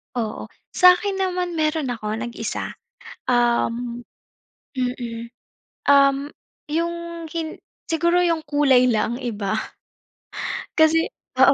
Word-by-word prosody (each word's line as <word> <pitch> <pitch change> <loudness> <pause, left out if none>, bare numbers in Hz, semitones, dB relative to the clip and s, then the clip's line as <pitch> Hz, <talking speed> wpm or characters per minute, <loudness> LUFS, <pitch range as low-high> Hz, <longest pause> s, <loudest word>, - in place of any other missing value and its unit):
Oo. 225 -3 -3 0.3
Sa'kin 365 +2 +5
naman, 365 -2 -1
meron 310 -2 0
ako 215 -3 -3
nag-isa. 230 -1 -4 0.6
Um, 240 0 +1 0.7
mm, 240 -2 -3 0.6
um, 280 0 +4 0.4
yung 335 +2 0 0.3
hin 320 0 -5 0.2
siguro 340 +2 +2
yung 335 -2 +2
kulay 270 -4 +4
lang 235 +1 0
iba. 215 -3 -2 1.2
Kasi 315 +1 +6 0.4
oo, - - +8
275 Hz, 95 wpm, -23 LUFS, 235-330 Hz, 1.2 s, oo